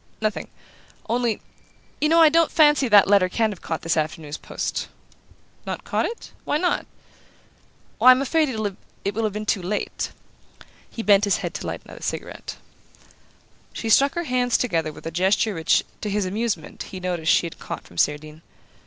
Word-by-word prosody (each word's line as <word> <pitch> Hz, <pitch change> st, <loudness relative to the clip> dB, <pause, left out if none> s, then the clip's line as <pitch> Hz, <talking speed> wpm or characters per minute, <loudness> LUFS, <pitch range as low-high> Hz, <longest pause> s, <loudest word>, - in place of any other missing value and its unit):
"Nothing. 215 Hz, -1 st, -2 dB, 0.6 s
Only 235 Hz, -1 st, 0 dB, 0.6 s
you 300 Hz, -, +2 dB
know 330 Hz, +1 st, +5 dB
I 320 Hz, -, +8 dB
don't 330 Hz, +1 st, +3 dB
fancy 295 Hz, -4 st, +4 dB
that 205 Hz, -3 st, +7 dB
letter 195 Hz, -2 st, +4 dB
can 220 Hz, +3 st, +1 dB
have 190 Hz, -, -9 dB
caught 160 Hz, -, -4 dB
this 165 Hz, 0 st, +1 dB
afternoon's 155 Hz, -1 st, -3 dB
post." -, -, -4 dB, 0.8 s
"Not -, -, -5 dB
caught -, -, 0 dB
it? 465 Hz, -, -8 dB
Why -, -, 0 dB
not?" 355 Hz, +2 st, 0 dB, 1.1 s
"Why, 255 Hz, -, +7 dB
I'm 255 Hz, 0 st, +8 dB
afraid 305 Hz, +2 st, +1 dB
it 205 Hz, -3 st, -5 dB
will 225 Hz, +3 st, -2 dB
have 215 Hz, -2 st, 0 dB
been 210 Hz, +1 st, -4 dB
too 205 Hz, -2 st, 0 dB
late." 195 Hz, +4 st, -3 dB, 0.8 s
He 230 Hz, -, -6 dB
bent 205 Hz, 0 st, +5 dB
his 200 Hz, -, +2 dB
head -, -, -4 dB
to -, -, -5 dB
light -, -, -5 dB
another -, -, -12 dB
cigarette. -, -, -5 dB, 1.2 s
She 225 Hz, -, -4 dB
struck 275 Hz, +5 st, +4 dB
her 345 Hz, -, -1 dB
hands 250 Hz, -4 st, +1 dB
together 165 Hz, -10 st, -1 dB
with 150 Hz, -, -14 dB
a 165 Hz, -, -3 dB
gesture 190 Hz, +5 st, +2 dB
which, 160 Hz, -3 st, +2 dB, 0.2 s
to 210 Hz, -, -3 dB
his 205 Hz, -1 st, 0 dB
amusement, 200 Hz, -4 st, -3 dB
he 185 Hz, -, -7 dB
noticed 175 Hz, -3 st, 0 dB
she -, -, +3 dB
had 165 Hz, -, -8 dB
caught -, -, -6 dB
from 85 Hz, -, -8 dB
Cerdine. 150 Hz, +1 st, -1 dB
210 Hz, 180 wpm, -23 LUFS, 175-250 Hz, 1.2 s, I